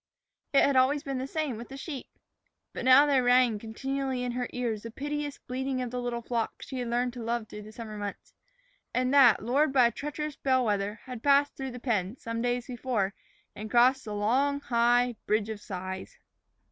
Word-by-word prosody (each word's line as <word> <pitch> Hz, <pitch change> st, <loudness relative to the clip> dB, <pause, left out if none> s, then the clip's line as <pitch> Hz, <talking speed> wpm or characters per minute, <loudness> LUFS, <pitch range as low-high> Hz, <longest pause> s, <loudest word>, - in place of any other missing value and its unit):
It 275 Hz, -, +5 dB
had 280 Hz, -, +3 dB
always 275 Hz, +3 st, +3 dB
been 275 Hz, -3 st, -3 dB
the 260 Hz, -, -3 dB
same 295 Hz, -5 st, -2 dB
with 235 Hz, -, -9 dB
the 270 Hz, -, -8 dB
sheep. 275 Hz, -2 st, -6 dB, 0.7 s
But -, -, -5 dB
now 260 Hz, +3 st, +8 dB
there 280 Hz, -3 st, +3 dB
rang 245 Hz, -3 st, +4 dB
continually 265 Hz, +3 st, -3 dB
in 250 Hz, -, -2 dB
her 245 Hz, 0 st, -2 dB
ears 235 Hz, -4 st, -2 dB
the 230 Hz, -, -7 dB
piteous 290 Hz, +3 st, -4 dB
bleating 260 Hz, +1 st, -3 dB
of 250 Hz, -2 st, -3 dB
the 250 Hz, 0 st, -3 dB
little 240 Hz, -1 st, -3 dB
flock 230 Hz, -1 st, -3 dB
she 260 Hz, -, -6 dB
had 245 Hz, -, -3 dB
learned 245 Hz, +1 st, 0 dB
to 245 Hz, -, -7 dB
love 230 Hz, -1 st, -2 dB
through 210 Hz, 0 st, -9 dB
the 215 Hz, +1 st, -11 dB
summer 215 Hz, -2 st, -8 dB
months, 205 Hz, -1 st, -7 dB, 0.6 s
and 255 Hz, +1 st, +1 dB
that, 250 Hz, -8 st, +6 dB
lured 275 Hz, +6 st, +2 dB
by 260 Hz, -3 st, +5 dB
a 235 Hz, -, +3 dB
treacherous 295 Hz, +1 st, -5 dB
bell 260 Hz, -2 st, +2 dB
wether, 205 Hz, -1 st, 0 dB
had 250 Hz, -3 st, -7 dB
passed 285 Hz, +1 st, +3 dB
through 270 Hz, -1 st, -4 dB
the 250 Hz, 0 st, -8 dB
pen, 220 Hz, -3 st, -1 dB
some 230 Hz, -1 st, -4 dB
days 245 Hz, 0 st, 0 dB
before, 235 Hz, -6 st, -2 dB, 0.4 s
and 215 Hz, +1 st, -7 dB
crossed 255 Hz, +3 st, +4 dB
the 210 Hz, -1 st, -5 dB
long, 265 Hz, +7 st, +1 dB
high 240 Hz, -1 st, +2 dB
Bridge 215 Hz, 0 st, +1 dB
of 215 Hz, -2 st, -5 dB
Sighs. 190 Hz, -1 st, -6 dB
245 Hz, 205 wpm, -29 LUFS, 225-270 Hz, 0.7 s, now